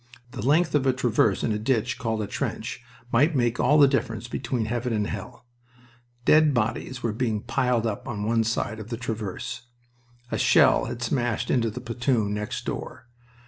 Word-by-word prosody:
The -, -, -6 dB
length 155 Hz, +6 st, +3 dB
of 140 Hz, -2 st, +2 dB
a 130 Hz, -, +4 dB
traverse 115 Hz, -5 st, +1 dB
in -, -, +1 dB
a 105 Hz, -, -1 dB
ditch 120 Hz, +1 st, 0 dB
called 110 Hz, -2 st, -1 dB
a -, -, -2 dB
trench 110 Hz, +3 st, -4 dB, 0.3 s
might 145 Hz, +7 st, +3 dB
make 120 Hz, -2 st, +1 dB
all 150 Hz, -, +4 dB
the 145 Hz, -2 st, +8 dB
difference 120 Hz, -4 st, -1 dB
between 120 Hz, -1 st, -2 dB
heaven 120 Hz, +2 st, -2 dB
and 105 Hz, -1 st, 0 dB
hell. 105 Hz, +4 st, -7 dB, 0.8 s
Dead 155 Hz, -2 st, +5 dB
bodies 120 Hz, +3 st, -2 dB
were 115 Hz, -2 st, 0 dB
being 110 Hz, -2 st, -1 dB
piled 125 Hz, -3 st, 0 dB
up 110 Hz, +1 st, -3 dB
on 105 Hz, -5 st, -4 dB
one 115 Hz, +1 st, +2 dB
side 110 Hz, -1 st, -2 dB
of 110 Hz, +1 st, -8 dB
the 115 Hz, -, -3 dB
traverse. 115 Hz, 0 st, -5 dB, 0.6 s
A -, -, -1 dB
shell -, -, +5 dB
had 120 Hz, -, -5 dB
smashed 120 Hz, -1 st, -1 dB
into 115 Hz, -3 st, +2 dB
the 120 Hz, +4 st, -7 dB
platoon 120 Hz, -3 st, 0 dB
next 105 Hz, 0 st, -4 dB
door. 120 Hz, -, -6 dB
115 Hz, 185 wpm, -25 LUFS, 110-125 Hz, 0.8 s, the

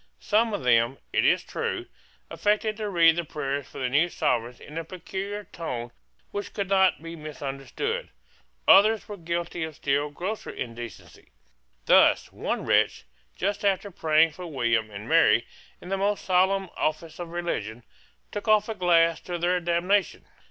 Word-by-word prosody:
Some 225 Hz, +2 st, +2 dB
of 205 Hz, -, -3 dB
them, 120 Hz, +1 st, +3 dB, 0.2 s
it -, -, +3 dB
is -, -, +3 dB
true, -, -, -3 dB, 0.5 s
affected 210 Hz, +1 st, +1 dB
to 215 Hz, -2 st, -3 dB
read 165 Hz, -3 st, +5 dB
the 170 Hz, -, 0 dB
prayers 140 Hz, -3 st, -4 dB
for -, -, -13 dB
the 130 Hz, -, -1 dB
new 150 Hz, +7 st, +2 dB
Sovereigns 120 Hz, -5 st, -1 dB
in 155 Hz, +2 st, -7 dB
a -, -, -4 dB
peculiar 195 Hz, +4 st, -6 dB
tone 120 Hz, -11 st, -6 dB, 0.4 s
which 205 Hz, 0 st, -5 dB
could 200 Hz, -2 st, -2 dB
not 190 Hz, -4 st, +3 dB
be 165 Hz, 0 st, -7 dB
misunderstood, 155 Hz, -, -4 dB, 0.6 s
Others 215 Hz, +2 st, +6 dB
were 210 Hz, -, -6 dB
guilty 170 Hz, -1 st, -3 dB
of 160 Hz, -1 st, -6 dB
still 145 Hz, +1 st, 0 dB
grosser 185 Hz, +9 st, -5 dB
indecency. 115 Hz, -4 st, -8 dB, 0.6 s
Thus, -, -, +4 dB
one -, -, -3 dB
wretch, -, -, +2 dB, 0.3 s
just 200 Hz, +2 st, -1 dB
after 200 Hz, 0 st, +1 dB
praying 160 Hz, -1 st, +3 dB
for 180 Hz, +3 st, -8 dB
William 120 Hz, -7 st, 0 dB
and 105 Hz, 0 st, -8 dB
Mary -, -, +4 dB, 0.3 s
in 180 Hz, -, -11 dB
the 195 Hz, -, 0 dB
most 200 Hz, +1 st, -1 dB
solemn 190 Hz, 0 st, +2 dB
office 160 Hz, +2 st, -2 dB
of 175 Hz, -1 st, -5 dB
religion, 120 Hz, -10 st, -4 dB, 0.5 s
took 205 Hz, +1 st, -5 dB
off 215 Hz, -1 st, +4 dB
a 225 Hz, -, -2 dB
glass 170 Hz, -4 st, +3 dB
to 175 Hz, -1 st, -5 dB
their 175 Hz, +1 st, +1 dB
damnation. 175 Hz, +3 st, 0 dB
170 Hz, 160 wpm, -26 LUFS, 145-195 Hz, 0.6 s, Others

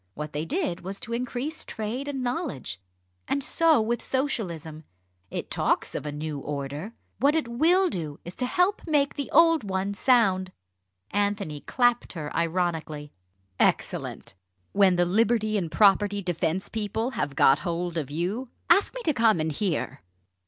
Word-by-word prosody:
what 150 Hz, 0 st, -6 dB
they 150 Hz, +2 st, -2 dB
did 310 Hz, -, -1 dB
was 195 Hz, +2 st, -6 dB
to 230 Hz, -, -5 dB
increase 250 Hz, +6 st, -2 dB
trade 225 Hz, +6 st, -4 dB
and 270 Hz, -3 st, -3 dB
knowledge. 245 Hz, -, -3 dB, 0.5 s
And 280 Hz, -, 0 dB
so 325 Hz, 0 st, +3 dB
with 230 Hz, +1 st, 0 dB
Socialism. 170 Hz, -, -3 dB, 0.5 s
It -, -, -5 dB
talks -, -, 0 dB
of -, -, -4 dB
a -, -, -2 dB
new 150 Hz, 0 st, -4 dB
order 145 Hz, +8 st, -5 dB, 0.3 s
what 285 Hz, +5 st, +4 dB
it 315 Hz, -6 st, 0 dB
will 335 Hz, +11 st, +3 dB
do 155 Hz, -, -4 dB
is 175 Hz, -, -7 dB
to 250 Hz, -, -1 dB
help 365 Hz, +7 st, +2 dB
to -, -, -11 dB
make 285 Hz, -2 st, +2 dB
the 285 Hz, -, -4 dB
old 330 Hz, +1 st, +5 dB, 0.3 s
sound!" 195 Hz, -6 st, +3 dB, 0.6 s
Anthony 200 Hz, -6 st, -1 dB
clapped 245 Hz, -, +1 dB
her 150 Hz, -4 st, -6 dB
ironically. 165 Hz, -3 st, -1 dB, 0.5 s
"Excellent! -, -, 0 dB, 0.4 s
When 195 Hz, -2 st, +4 dB
the 175 Hz, 0 st, +3 dB
Liberty 215 Hz, +3 st, +2 dB
and 175 Hz, -6 st, -1 dB
Property 205 Hz, 0 st, +4 dB
Defence 175 Hz, +2 st, -1 dB
people 220 Hz, +3 st, -2 dB
have 145 Hz, -, -3 dB
got 135 Hz, +2 st, +5 dB
hold 170 Hz, +2 st, -3 dB
of 150 Hz, -5 st, -2 dB
you 185 Hz, -, -2 dB, 0.2 s
ask 395 Hz, +7 st, +4 dB
me -, -, -5 dB
to 310 Hz, -, +2 dB
come 225 Hz, -7 st, +3 dB
and 155 Hz, 0 st, 0 dB
hear!" 175 Hz, +1 st, -2 dB
205 Hz, 160 wpm, -26 LUFS, 165-255 Hz, 0.6 s, old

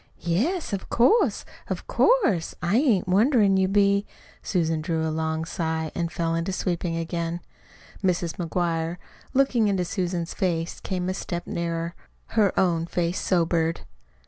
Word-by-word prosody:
"Yes, 235 Hz, -, 0 dB
of 195 Hz, -, -4 dB
course, 255 Hz, -, +3 dB, 0.2 s
of -, -, -4 dB
course, 380 Hz, -, +2 dB
I 175 Hz, +6 st, +1 dB
ain't 240 Hz, -10 st, +3 dB
wonderin' 205 Hz, +1 st, +4 dB
you 190 Hz, 0 st, +3 dB
be!" 200 Hz, +1 st, +3 dB, 0.3 s
Susan 165 Hz, -4 st, 0 dB
drew 160 Hz, -1 st, -1 dB
a 155 Hz, -, -2 dB
long 160 Hz, 0 st, -1 dB
sigh 160 Hz, -1 st, -2 dB
and 170 Hz, -1 st, -2 dB
fell 165 Hz, 0 st, -1 dB
to 175 Hz, -, -2 dB
sweeping 175 Hz, -2 st, -2 dB
again. 165 Hz, 0 st, -2 dB, 0.6 s
Mrs. 175 Hz, -2 st, 0 dB
McGuire, 170 Hz, -1 st, -1 dB, 0.4 s
looking 255 Hz, -5 st, +3 dB
into 190 Hz, -3 st, +1 dB
Susan's 175 Hz, -2 st, -2 dB
face, 170 Hz, -3 st, -1 dB
came 180 Hz, -2 st, -3 dB
a 185 Hz, -, 0 dB
step 175 Hz, -2 st, -4 dB
nearer. 170 Hz, 0 st, -3 dB, 0.4 s
Her 210 Hz, -4 st, +3 dB
own 170 Hz, -3 st, +2 dB
face 175 Hz, +1 st, -1 dB
sobered. 165 Hz, -, +1 dB
175 Hz, 145 wpm, -25 LUFS, 165-195 Hz, 0.6 s, wonderin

